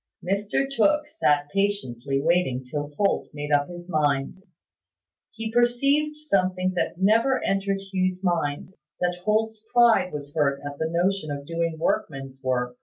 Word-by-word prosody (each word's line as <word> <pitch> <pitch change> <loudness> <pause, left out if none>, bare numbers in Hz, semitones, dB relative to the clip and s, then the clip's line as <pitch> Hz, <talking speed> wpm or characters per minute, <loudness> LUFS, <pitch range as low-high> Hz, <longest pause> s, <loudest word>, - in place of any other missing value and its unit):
Mr 200 +8 0
Tooke 295 +4 +2
sat 150 - +1
patiently 140 - 0
waiting 145 -5 +1
till 145 +3 -4
Holt 200 -1 +1
had - - -32
made 145 0 -4
up 145 +1 +2
his 175 0 -9
mind. 150 0 0 0.9
He 225 0 -5
perceived 275 +6 +2
something 185 -10 0
that 175 - -1
never 225 +7 +3
entered 195 0 0
Hugh's 185 0 0
mind: 170 -1 -1 0.3
that 180 0 -1
Holt's 220 0 0
pride 235 -6 +5
was 145 -1 -7
hurt 140 -3 +1
at 145 0 -6
the 160 - -1
notion 175 0 0
of 140 -1 -5
doing 165 0 -2
workman's 135 -4 -2
work. 125 -1 -1
180 Hz, 150 wpm, -25 LUFS, 145-210 Hz, 0.9 s, pride